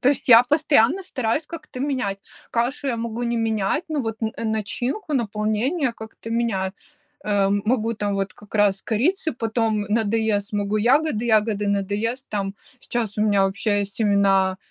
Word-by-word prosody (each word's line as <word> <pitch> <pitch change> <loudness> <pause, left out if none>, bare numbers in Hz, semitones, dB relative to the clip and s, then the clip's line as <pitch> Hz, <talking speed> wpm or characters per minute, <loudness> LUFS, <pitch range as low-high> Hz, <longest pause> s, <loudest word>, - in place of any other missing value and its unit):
То 255 - +3
есть 280 -2 0
я 235 0 +9
постоянно 295 +3 +3
стараюсь 270 -2 -2
как-то 300 -6 -8
менять. 255 -9 -1 0.3
Кашу 245 +4 -1
я 235 - 0
могу 230 +1 -4
не 235 0 -1
менять, 220 - 0
ну 305 -2 -1
вот 225 -2 -5
н 220 - -1
э, 230 - -3
начинку, 240 - -2
наполнение 235 - 0
как-то 220 0 -10
меняю. 210 -5 0 0.5
Э, 210 - -3 0.2
м 200 0 +1
могу 230 -1 +1
там 205 -1 -2
вот 195 0 -2
как 210 +1 -17
раз 200 -2 +2
корицы, 315 - 0
потом 225 -2 0
надоест, 220 -2 0
могу 205 +1 0
ягоды, 255 +1 +2
ягоды 210 -2 +2
надоест 205 +6 -1
Там 200 -1 -2 0.3
сейчас 220 -4 -3
у - - +3
меня 205 -2 +3
вообще 205 +1 +1
есть 200 0 -4
семена, 195 -3 +3
220 Hz, 165 wpm, -23 LUFS, 205-245 Hz, 0.5 s, я